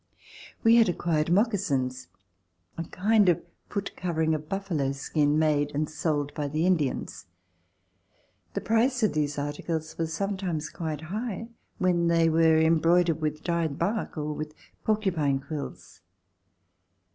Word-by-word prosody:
We 230 +1 +7
had 230 -4 +5
acquired 165 -2 0
moccasins, 175 - +1 0.7
a 165 - -4
kind 205 +3 +3
of 170 - +1 0.3
foot 200 -1 -3
covering 160 -3 0
of 155 0 -4
buffalo 170 -9 -1
skin, 145 +2 +1
made 150 -2 +2
and 150 +1 0
sold 150 -2 -1
by 150 -2 -2
the 155 +4 0
Indians. 160 - -1 1.3
The - - -1
price 240 +2 +2
of 215 - +3
these 150 -1 -1
articles 155 +3 -4
was 165 -1 -1
sometimes 180 -4 -2
quite 160 -3 -4
high 225 0 -4 0.3
when 175 -2 +2
they 165 -1 +4
were 160 0 +4
embroidered 165 +1 +3
with 155 0 -2
dyed 170 -4 -1
bark 205 +1 -2
or 150 0 -2
with 155 0 -6 0.3
porcupine 175 -11 +1
quills. 140 - -7
160 Hz, 135 wpm, -27 LUFS, 150-185 Hz, 1.3 s, We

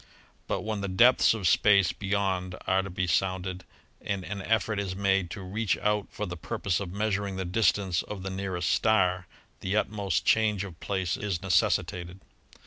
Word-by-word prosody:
But 95 - -1
when 110 0 -3
the 100 - -2
depths 115 +5 +5
of 100 -5 -1
space 100 -1 +4
beyond 95 -2 -2
are 95 0 +2
to 100 - -7
be 95 0 -2
sounded 95 +1 -1 0.4
and 100 -2 -3
an 100 +1 -5
effort 110 0 0
is 95 -2 -3
made 95 -2 +1
to 100 +1 -7
reach 100 +2 -1
out 105 -1 0
for 105 - -4
the 90 - -5
purpose 100 +1 -2
of 100 -3 -5
measur 100 +1 -1
ing 95 - -6
the 95 0 -3
distance 95 -2 +1
of 100 -3 -7
the 95 - -4
nearest 95 -2 -2
star 95 -5 +2 0.3
the 95 +3 -1
utmost 100 -5 -1
change 105 -3 +2
of 90 -4 -9
place 95 -3 -2
is 95 -4 -3
necessitated. 90 -1 0
95 Hz, 180 wpm, -28 LUFS, 90-105 Hz, 0.4 s, depths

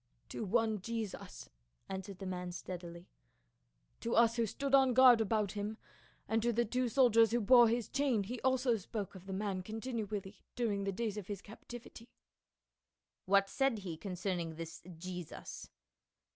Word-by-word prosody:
"To - - -4
one 220 0 +1
Jesus," 220 - -5 0.4
answered 190 0 -6
the 195 - -7
man 180 -1 -4
steadily. 175 -1 -7 0.9
"To 230 - -1
us 230 0 +5
who 230 -2 +1
stood 275 +6 -3
on 265 -3 +6
guard 250 -3 +8
about 215 -2 +1
him, 210 +1 -4 0.5
and 225 0 +1
to 240 +2 +2
the 235 +1 +1
two 250 +2 0
soldiers 230 -3 +5
who 240 - +1
bore 240 +2 +7
his 235 0 0
chain 265 -6 +1
he 235 +4 -6
also 260 -2 +2
spoke 200 0 -5
of 190 0 -12
the - - -5
man 195 -1 -2
continually 215 -2 -5
during 205 -5 0
the 195 - 0
days 215 +1 -3
of 200 -3 -6
his 200 -2 -5
captivity." 230 +2 -11 1.2
"What 195 +1 +4
said 270 +1 +1
he 185 -5 -5
concerning 180 -2 -3
this 165 0 -7 0.2
Jesus?" 180 -1 -7
215 Hz, 160 wpm, -34 LUFS, 190-235 Hz, 1.2 s, guard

